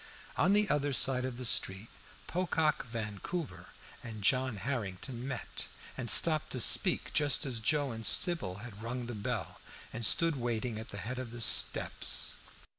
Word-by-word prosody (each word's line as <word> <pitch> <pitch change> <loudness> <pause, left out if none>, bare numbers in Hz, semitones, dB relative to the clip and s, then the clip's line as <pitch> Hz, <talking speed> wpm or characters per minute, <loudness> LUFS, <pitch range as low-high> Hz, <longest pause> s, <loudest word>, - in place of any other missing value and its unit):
On 190 - +2
the 210 0 +3
other 145 -3 -1
side 130 0 +3
of 130 -2 -6
the 130 - -6
street 95 -2 +2 0.4
Pocock 160 -6 -1
Vancouver 115 - -6 0.3
and 110 -3 -9
John 130 0 +1
Harrington 120 +1 -5
met, 135 -3 -6 0.3
and 120 -3 -6
stopped 155 -2 +5
to 130 - -2
speak 180 - +4
just 145 0 +1
as 125 -4 -3
Joe 145 +4 0
and 115 0 -7
Sybil 165 - +1
had 105 -3 -11
rung 120 +2 -5
the 120 - -6
bell, 105 -5 -5 0.3
and 120 - -5
stood 165 - +4
waiting 120 -2 -3
at 110 - -9
the 100 - -8
head 125 +5 -5
of 130 -2 -6
the 120 +1 -9
steps. 115 - +2
125 Hz, 165 wpm, -31 LUFS, 110-145 Hz, 0.4 s, stopped